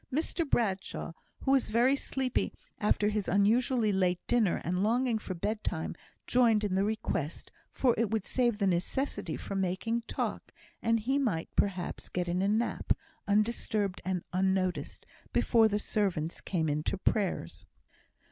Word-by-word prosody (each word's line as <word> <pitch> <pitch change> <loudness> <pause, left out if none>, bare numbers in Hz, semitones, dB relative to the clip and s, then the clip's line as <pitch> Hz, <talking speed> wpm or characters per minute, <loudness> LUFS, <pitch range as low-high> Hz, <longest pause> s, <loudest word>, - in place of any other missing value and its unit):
Mr 315 +2 -1
Bradshaw, 195 -8 -1 0.3
who 270 - +1
was 270 -2 +3
very 240 +5 +4
sleepy 265 -2 -1 0.3
after 210 -1 +2
his 210 -2 -1
unusually 220 +3 +3
late 185 -2 +2
dinner, 225 -7 +2
and 180 +2 0
longing 235 +2 +2
for 185 -3 -5
bedtime, 180 -3 -2 0.3
joined 230 -4 +4
in 205 -3 0
the 190 +1 +2
request, 205 -8 -2 0.2
for 250 -3 +3
it 230 -3 +2
would 220 -3 -1
save 240 -4 +1
the 205 - +1
necessity 185 - -1
for - - -6
making 195 +5 0
talk, - - -3 0.3
and 230 -1 +2
he 265 +6 +1
might, 200 -12 -1
perhaps, 185 -3 -1
get 180 -1 -2
in 175 +1 0
a 195 - +2
nap, 220 +3 +1 0.3
undisturbed 210 -2 +1
and 185 -1 -2
unnoticed, 185 -1 0 0.3
before 225 -2 +4
the 205 -1 0
servants 185 -7 -1
came 165 -4 -1
in 150 0 0
to 195 - -2
prayers. 190 - -1
210 Hz, 150 wpm, -30 LUFS, 185-235 Hz, 0.3 s, very